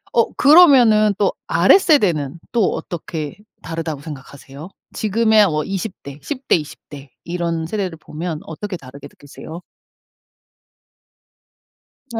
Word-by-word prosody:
어 230 - +2
그러면은 250 - +6
또 200 - +1
아래 175 - +5
세대는 175 - +1
또 230 -5 +1
어떻게 160 -3 -6 0.3
다르다고 165 -3 -5
생각하세요? 140 +1 -11 0.2
지금의 220 0 +3
어 155 -5 -1
20 195 +4 -4
대, 140 +1 -10
10 270 - -7
대, - - +4
20 150 -3 -5
대 140 -1 -11
이런 170 -1 -3
세대를 185 -2 -4
보면 160 +1 -6
어떻게 185 +4 -7
다르게 140 0 -12
느끼세요? 155 +4 -12 2.5
아. 225 - -2
170 Hz, 240 characters per minute, -19 LUFS, 150-215 Hz, 2.5 s, 그러면은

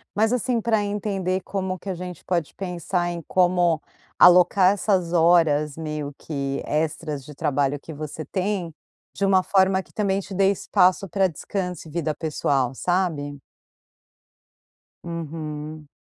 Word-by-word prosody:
Mas, 220 +3 +2
assim, 245 -1 0
pra 220 -2 +1
entender 195 -2 -2
como 190 -2 -3
que 195 - -8
a - - -1
gente 180 -1 -8
pode 170 -5 -1
pensar 180 -1 -2
em 170 -1 -5
como 175 -3 +2 0.4
alocar 180 +2 +7
essas 185 -4 0
horas, 160 -3 +3
meio 150 -2 -4
que 140 -2 -3
extras 150 -2 -2
de 150 - -11
trabalho 140 0 0
que 160 - -10
você 155 +1 -6
tem, 185 -4 -2 0.4
de 200 - 0
uma 190 -1 +4
forma 190 0 +3
que - - -25
também 195 -2 0
te 195 0 -8
dê 195 +1 +3
espaço 185 0 +2
pra 190 +1 +2
descanso 180 0 -5
e - - -12
vida 160 -2 -1
pessoal, 140 -5 0
sabe? 155 -6 -1 1.6
Uhum. 155 -2 -6
175 Hz, 140 wpm, -24 LUFS, 155-190 Hz, 1.6 s, alocar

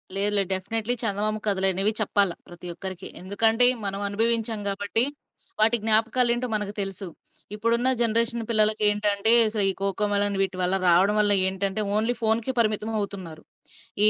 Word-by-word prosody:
లేదు. 200 +1 +1
లేదు. 195 -2 -1
డెఫినెట్లీ 220 +5 -3
చందమామ 215 0 -2
కథలనేవి 195 0 +1
చెప్పాల 200 -2 +1 0.2
ప్రతి 175 0 -12
ఒక్కరికి. 190 +1 -6
ఎందుకంటే 220 +5 +4 0.2
మనం 195 0 -4
అనుభవించాం 225 +1 -1
గాబట్టి, 205 +3 +1 0.6
వాటి 225 +2 +3
జ్ఞాపకాలేంటో 235 +3 +1
మనకు 205 -1 -3
తెలుసు. 195 -1 -5 0.5
ఇప్పుడున్న 230 +3 -1
జనరేషన్ 230 0 +1
పిల్లలకేంటంటే, 210 -1 +2
అసలు 215 -1 0
ఈ - - -8
కోకో 195 +1 -1
మెలన్ 200 0 -1
వీటివల్ల 185 -1 -2
రావడం 185 +4 +2
వల్ల 205 -1 +3
ఏంటంటే 195 +2 -2
ఓన్లీ 225 +3 -1
ఫోనుకే 225 +3 -1
పరిమితమవుతున్నారు. 205 -6 -4 0.6
ఈ - - +9
210 Hz, 130 wpm, -23 LUFS, 195-225 Hz, 0.6 s, ఈ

